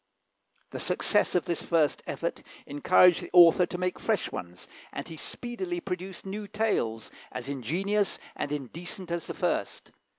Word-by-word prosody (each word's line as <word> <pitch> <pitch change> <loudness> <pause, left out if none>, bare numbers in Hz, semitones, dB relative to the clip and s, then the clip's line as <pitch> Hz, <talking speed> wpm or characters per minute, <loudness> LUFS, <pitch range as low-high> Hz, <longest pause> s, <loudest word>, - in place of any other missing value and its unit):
The - - -5
success 205 -3 +1
of 180 - +2
this 170 - -1
first 160 -4 +2
effort - - -3 0.2
encouraged 175 +4 +5
the - - -7
author 175 0 +8
to 180 - -4
make 180 0 -2
fresh 220 -5 0
ones, 90 0 -7 0.2
and - - -6
he 165 - -7
speedily 250 - -4
produced 185 - -6
new 205 +2 -5
tales, 200 - -1 0.2
as 125 +1 -5
ingenious 185 - 0 0.2
and 145 - -3
indecent 170 - -5
as 170 -1 -2
the - - -5
first. - - -2
180 Hz, 155 wpm, -28 LUFS, 150-200 Hz, 0.2 s, author